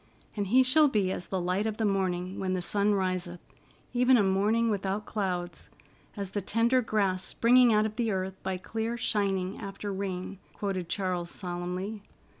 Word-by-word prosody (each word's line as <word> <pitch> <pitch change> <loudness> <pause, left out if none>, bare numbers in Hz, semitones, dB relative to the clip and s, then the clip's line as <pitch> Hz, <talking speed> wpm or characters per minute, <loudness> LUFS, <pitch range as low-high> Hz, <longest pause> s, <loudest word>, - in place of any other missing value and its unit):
"'And 205 -2 -2
he 255 +6 +5
shall 295 +4 +5
be 205 -8 +1
as 180 - -4
the 190 - -2
light 180 +4 0
of 215 -1 -3
the 225 - 0
morning 185 -2 -1
when 185 -1 -1
the 185 - -1
sun 205 +3 +2
riseth, 185 -2 -1 0.5
even 250 +1 +5
a 210 - +4
morning 210 +4 +2
without 200 +1 -2
clouds; 180 -4 -3 0.5
as 200 -2 -4
the 205 - -2
tender 230 +6 +2
grass 200 -5 0
springing 245 +1 +4
out 215 0 +4
of 215 +1 -4
the 230 -3 +1
earth 190 0 -2
by 190 -1 -2
clear 225 +5 -3
shining 195 -4 -1
after 200 -1 -5
rain,'" 190 0 -4
quoted 190 -4 -3
Charles 180 -3 -1
solemnly. 180 +4 -4
195 Hz, 175 wpm, -29 LUFS, 185-220 Hz, 0.5 s, he